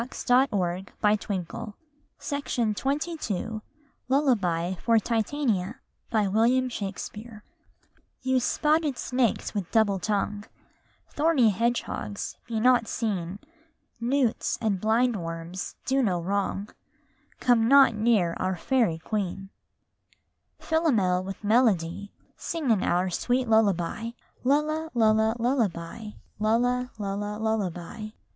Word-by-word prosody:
John 255 +2 +5
Bunyan 185 -1 -1 0.2
RAINBOW 210 +1 -1
GOLD 280 - -3 0.5
LULLABY 190 - +1
FOR 230 -1 +3
TITANIA 225 -3 0 0.3
First 220 0 0
Fairy 215 0 -10 0.8
You 260 0 +2
spotted 300 +1 +1
snakes 250 -3 0
with 200 -5 -3
double 210 -4 +2
tongue, 205 +2 -1 0.7
Thorny 290 -7 +3
hedgehogs, 230 -1 -2
be 225 -2 -2
not 245 -1 +4
seen; 195 -5 -2 0.6
Newts, 245 0 0
and 205 -5 0
blind 230 +2 +2
worms, 165 +2 -6
do 270 +1 +2
no 190 -8 +1
wrong; 200 +3 -2 0.7
Come 235 -3 +3
not 275 -2 +7
near 215 -6 +2
our 185 0 -1
fairy 225 -3 +1
queen. 195 +1 -4 1.1
Chorus - - -17
Philomel 215 - +2
with 195 +2 -7
melody 205 -4 +2 0.2
Sing 315 -7 -2
in 210 -4 +3
our 180 +1 +1
sweet 250 +7 0
lullaby! 220 +1 +1 0.3
Lulla, 305 +4 +1
lulla, 220 -1 +3
lullaby; 225 -5 -1 0.3
lulla, 245 +3 +1
lulla, 205 0 -3
lullaby! 215 -1 -2
220 Hz, 100 wpm, -27 LUFS, 195-250 Hz, 1.1 s, not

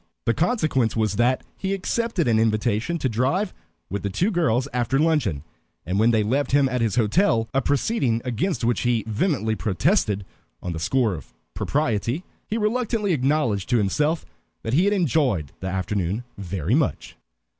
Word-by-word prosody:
The 115 - +3
consequence 155 - +1
was 110 -2 0
that 125 +2 +2 0.2
he 195 0 -1
accepted 205 - -1
an 110 -2 +3
invitation 110 +7 +1
to 140 - -1
drive 135 - 0 0.3
with 100 +2 -4
the 100 - -2
two 175 - 0
girls 135 - +1
after 125 +1 +1
luncheon, 140 - +1 0.4
and 90 +4 -1
when 110 +2 +5
they 110 -2 +3
left 135 +6 0
him 140 -1 +5
at 125 -2 -1
his 110 -4 +1
hotel, 115 - +2
a 135 - +2
proceeding 135 - +1
against 125 - -1
which 120 +1 +2
he 120 -2 +1
vehemently 110 - 0
protested 105 - +1 0.3
on 90 - -4
the 80 - -4
score 115 +5 +1
of 75 -7 -10 0.2
propriety, 135 - -1 0.2
he 215 - -2
reluctantly 220 -2 0
acknowledged 130 - +1
to 125 - +3
himself 150 - +1 0.4
that 115 - -3
he 170 +7 +4
had 205 - +3
enjoyed 135 - +1
the 95 - -5
afternoon 95 +2 -2
very 95 -1 -3
much. 145 0 0
125 Hz, 165 wpm, -24 LUFS, 105-160 Hz, 0.4 s, when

